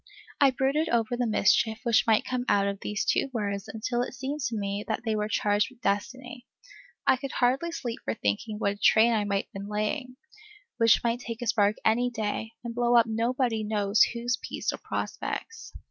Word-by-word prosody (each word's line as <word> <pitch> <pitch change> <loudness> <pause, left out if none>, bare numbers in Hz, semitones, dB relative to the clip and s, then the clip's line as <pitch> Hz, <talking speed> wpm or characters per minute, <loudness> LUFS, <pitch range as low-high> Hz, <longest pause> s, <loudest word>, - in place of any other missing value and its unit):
I 280 - +6
brooded 270 +5 0
over 235 0 +1
the 245 -1 0
mischief 220 +1 +2
which 235 -2 +3
might 220 -1 +3
come 250 -1 -2
out 200 -1 +3
of 200 -1 -3
these 210 -1 -2
two - - +1
words 200 -4 -3
until 240 +2 -2
it 245 - -4
seemed 270 +3 -4
to 230 -2 -3
me 200 0 -3
that - - -2
they 220 -1 0
were 210 0 -1
charged 205 0 +1
with 255 -2 -20
destiny. 245 +5 -3 0.6
I - - +4
could 275 +2 -6
hardly 265 +7 +1
sleep 245 -8 -5
for 110 - -2
thinking 105 - -2
what 200 -2 0
a 200 - -7
train 220 +3 +5
I 210 -2 +1
might 200 -1 -1
have - - -47
been 200 +1 -7
laying, 250 +5 -2 0.6
which 230 -2 +4
might 235 0 0
take 230 -1 -6
a - - -4
spark 210 -2 +2
any 240 +3 +3
day, 220 -1 -3
and 235 -1 -5
blow 240 0 +2
up 235 -1 +6
nobody 230 0 0
knows 210 -1 +1
whose 235 -1 +2
peace - - -3
or - - -7
prospects. 455 - -5
230 Hz, 205 wpm, -27 LUFS, 210-245 Hz, 0.6 s, I